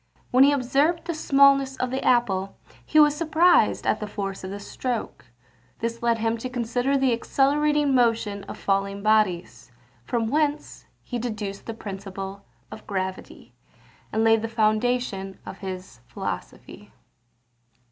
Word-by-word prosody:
When 255 +2 +6
he 280 - +6
observed 285 +5 +1
the 340 - -2
smallness 275 -3 +4
of 250 -1 -2
the 265 - -2
apple, 195 -6 +1 0.3
he 310 - +2
was 295 -1 +6
surprised 330 +2 +3
at - - +1
the 210 - -4
force 195 -2 -5
of 185 - -5
the 200 +1 -6
stroke. 240 +3 -5 0.5
This 230 0 -4
led 235 -1 +2
him 225 +1 -1
to 255 - -5
consider 245 +3 0
the 265 -2 +2
accelerating 290 +4 +2
motion 230 -5 +1
of - - -8
falling 200 0 -1
bodies; 180 - +1 0.3
from 230 - -1
whence 295 +4 -1 0.2
he 245 - -4
deduced 215 -4 -5
the 225 - -5
principle 195 -1 -7 0.3
of 215 0 -11
gravity, 190 -2 -5 0.6
and 220 - +1
laid 225 -1 +4
the 225 - -2
foundation 215 -3 0
of - - -9
his 185 - -7
philosophy. - - -7
230 Hz, 145 wpm, -24 LUFS, 200-270 Hz, 0.6 s, When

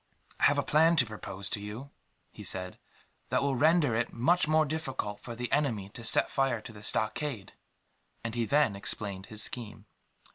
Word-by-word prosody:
"I - - +4
have - - +4
a - - +2
plan 160 +3 +4
to 140 -6 +5
propose 100 -3 -5
to - - 0
you," 110 +7 -7 0.4
he - - -11
said, 90 -1 -2 0.5
"that - - +1
will 140 -1 +1
render 155 -1 +4
it 115 +1 0
much 150 +8 +2
more 155 0 +4
difficult 135 -9 -4
for 120 - -8
the 120 +1 -4
enemy 115 -10 0
to 120 +3 -10
set 110 - +5
fire 135 -4 0
to 110 - -10
the 105 - -12
stockade;" 110 +2 -1 0.7
and 115 -1 -4
he 120 -1 0
then 140 -5 +3
explained 100 -1 -4
his 110 0 -4
scheme. 110 -4 -6
120 Hz, 185 wpm, -30 LUFS, 105-145 Hz, 0.7 s, to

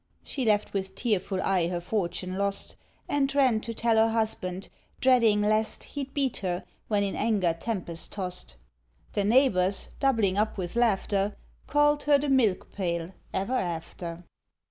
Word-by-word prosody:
She 265 -3 -3
left 210 -1 +2
with 190 -1 -3
tearful 200 -5 -1
eye 185 -3 +2
her 175 0 -2
fortune 185 -1 -2
lost, 200 0 -2 0.3
And 275 -1 0
ran 255 -6 +4
to 230 - -5
tell 230 0 +1
her 225 +1 +5
husband, 205 -5 -2 0.3
dreading 230 -5 +4
lest 215 +1 +1
He'd 275 -2 -6
beat 275 -4 0
her, 180 -2 -2 0.2
when 205 -2 +2
in 195 - -1
anger 205 -6 +1
tempest 170 -2 -4
tossed. 180 - -5 0.6
The 205 - +1
neighbours, 200 -5 +3
doubling 225 -8 +2
up 215 0 0
with 180 0 -4
laughter, 205 -3 +1 0.3
Called 295 0 +3
her 290 -1 +6
the 285 +1 -2
Milk 230 -9 +2
pail 170 -3 -2 0.2
ever 195 +7 -1
after. 170 -3 -3
205 Hz, 150 wpm, -28 LUFS, 185-235 Hz, 0.6 s, her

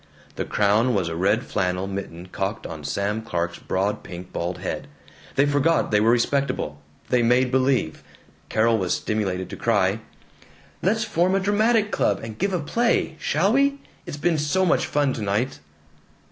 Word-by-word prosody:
The - - -3
crown 105 +4 +2
was 90 -4 0
a 80 - -4
red 100 +7 +2
flannel 90 -1 -1
mitten 95 -2 -6
cocked 95 +2 -3
on 80 -2 -7
Sam 100 +8 -1
Clark's 85 -6 -3
broad 100 +3 -1
pink 90 +1 -9
bald 90 +1 -2
head. - - -4 0.5
They 140 +1 +4
forgot 145 +2 +2
they 105 - +4
were 110 - +4
respectable. 120 - 0 0.3
They 125 -1 +3
made 125 +2 +3
believe. 130 -10 +1 0.5
Carol 115 +1 +3
was 90 -2 0
stimulated 95 -4 -2
to - - -6
cry: - - +1 0.8
"Let's 220 +4 +1
form 185 -3 +1
a - - +3
dramatic 210 +2 +2
club - - +1
and 110 -1 -7
give 195 +2 +1
a 180 - 0
play! 230 +2 +1
Shall 185 +9 +1
we? 280 +1 +3 0.3
It's 145 - -5
been 160 +1 +1
so 170 +6 +1
much 175 - +2
fun 145 -2 +1
tonight!" 110 +3 -1
115 Hz, 165 wpm, -24 LUFS, 95-160 Hz, 0.8 s, They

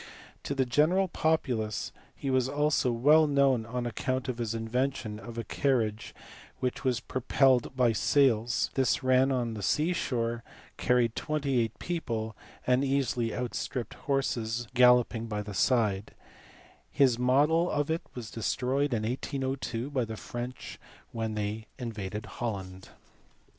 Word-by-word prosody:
To 140 - -2
the 135 -1 +2
general 155 +10 +3
populace 130 - -1 0.2
he 135 - -3
was 130 -1 +2
also 145 -2 +1
well 150 +7 +5
known 135 -5 +2
on 125 +1 -3
account 130 +3 -2
of 125 -2 -3
his 115 -1 -2
invention 115 -1 -2
of 115 0 -9
a 115 - -2
carriage 115 -3 -1 0.4
which 125 -1 -2
was 125 -3 +1
pro 130 - -4
pelled 130 0 +3
by 125 -3 +3
sails 120 -2 +2
\ - - -27
this 130 0 +1
ran 130 +1 +4
on 120 -3 -1
the 105 - -6
sea 155 - +1
shore, 120 -7 -2 0.3
carried 120 -2 +2
twenty 140 -4 0
eight 115 -1 -1
people, 115 -11 -3 0.3
and 125 +2 +3
easily 130 -4 0
outstripped 125 0 -3
horses 120 -4 -1
galloping 125 -2 +4
by 105 -1 -3
the 105 0 -7
side: 105 -1 +1 0.7
his 130 -4 +3
model 150 +7 +3
of 145 +1 0
it 165 - 0
was 120 -3 -7
destroyed 130 +4 0
in 110 - -2
1802 130 +1 -3
by 130 -3 +1
the 110 -1 -6
French 120 +3 -7 0.3
when 110 -1 -3
they 105 +1 -3
invaded 105 -4 -5
Holland. 95 -5 -5
125 Hz, 145 wpm, -29 LUFS, 115-135 Hz, 0.7 s, well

